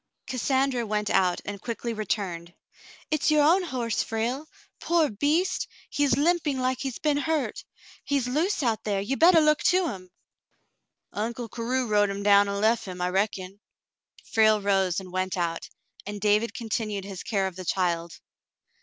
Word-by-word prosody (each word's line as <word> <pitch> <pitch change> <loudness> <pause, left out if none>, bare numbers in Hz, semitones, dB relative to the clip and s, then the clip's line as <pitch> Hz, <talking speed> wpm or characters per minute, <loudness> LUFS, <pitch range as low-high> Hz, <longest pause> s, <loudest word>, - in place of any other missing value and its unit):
Cassandra 265 0 0
went 210 -1 -1
out 185 -2 +2
and 200 -1 -6
quickly 235 0 -4
returned. 185 -5 -3 0.3
" - - -21
It's 310 0 +2
your 305 -1 +4
own 340 +6 +5
horse, 250 - -2
Frale. 240 +7 -2 0.3
Poor 335 -5 +2
beast! 315 - 0 0.2
He's 285 -4 +2
limping 305 -2 +1
like 255 0 0
he's 265 -3 -4
been 300 -2 +1
hurt. 310 0 -1 0.4
He's 280 -3 0
loose 310 +6 0
out 230 -3 0
there. 205 -2 -1
You 215 +8 -2
better 335 +3 +6
look 305 -1 +3
to 360 -2 +3
him." 185 -5 -8 0.5
" - - -44
Uncle 230 +3 -3
Carew 250 +3 -1
rode 205 -2 +2
him 200 0 -4
down 200 0 +5
an' 200 0 -2
lef 225 +1 +2
him, 180 -1 -7
I 180 0 0
reckon." 195 0 -2 0.7
Frale 215 -1 +4
rose 195 -3 +1
and 185 -1 -11
went 185 0 -1
out, 170 -1 -2 0.4
and 205 0 -5
David 210 +3 +1
continued 215 -3 -3
his 195 -2 -7
care 200 -6 -1
of 190 -2 -4
the 185 - -7
child. 170 -2 -1
225 Hz, 170 wpm, -26 LUFS, 195-275 Hz, 0.7 s, better